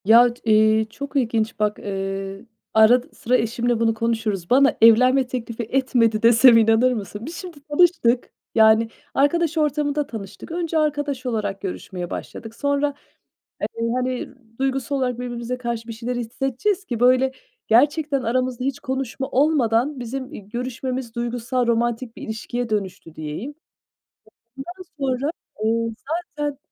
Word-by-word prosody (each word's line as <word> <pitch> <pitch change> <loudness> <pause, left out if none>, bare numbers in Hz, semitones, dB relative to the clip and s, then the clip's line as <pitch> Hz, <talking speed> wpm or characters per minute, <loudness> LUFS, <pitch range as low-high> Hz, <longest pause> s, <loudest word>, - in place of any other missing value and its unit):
Yaç 235 +3 +6
iii, 220 0 +4
çok 280 +6 -8
ilginç 225 -4 0
bak, 210 -1 0
ııı, 195 0 -4 0.3
arad 220 +3 +6
sıra 250 +2 +1
eşimle 235 +1 0
bunu 225 -1 +2
konuşuruz. 220 -5 -2
Bana 275 +2 +4
evlenme 255 +4 +6
teklifi 235 -2 -4
etmedi 230 -3 +1
desem, 235 +1 +7
inanır 225 +3 +4
mısın? 210 0 -6
Biz 330 +4 -7
şimdi 350 -3 -8
tanıştık, 295 -7 +3 0.2
yani 220 0 +5 0.2
arkadaş 325 +3 +2
ortamında 295 -1 0
tanıştık. 210 +4 -8
Önce 335 -1 -1
arkadaş 290 -4 -1
olarak 210 -5 -2
görüşmeye 180 -2 -5
başladık. 225 0 -7
Sonra, 285 +2 0 0.7
eee, 230 0 -2
hani, 255 0 -2 0.3
duygusal 270 +1 -1
olarak 250 -3 -1
birbirimize 245 0 -4
karşı 235 -2 -4
bir - - -4
şeyler 235 +2 -4
hissedeceğiz 270 - -2
ki, 240 -9 -4
böyle, 255 +1 +4 0.3
gerçekten 285 +3 +3
aramızda 250 +1 -1
hiç 275 -1 -2
konuşma 265 0 -3
olmadan 265 -2 +2
bizim, 260 +3 -5
iii, 200 - -10
görüşmemiz 250 +1 -4
duygusal, 240 +1 -1
romantik 235 0 0
bir - - -9
ilişkiye 235 +2 -4
dönüştü 195 -6 -4
diyeyim. 155 - -6 1.0
Ondan 355 +7 -7 0.2
sonra, 270 +1 0 0.3
ııı, 230 0 0 0.4
zaten 290 -2 -2
245 Hz, 135 wpm, -22 LUFS, 225-270 Hz, 1.0 s, desem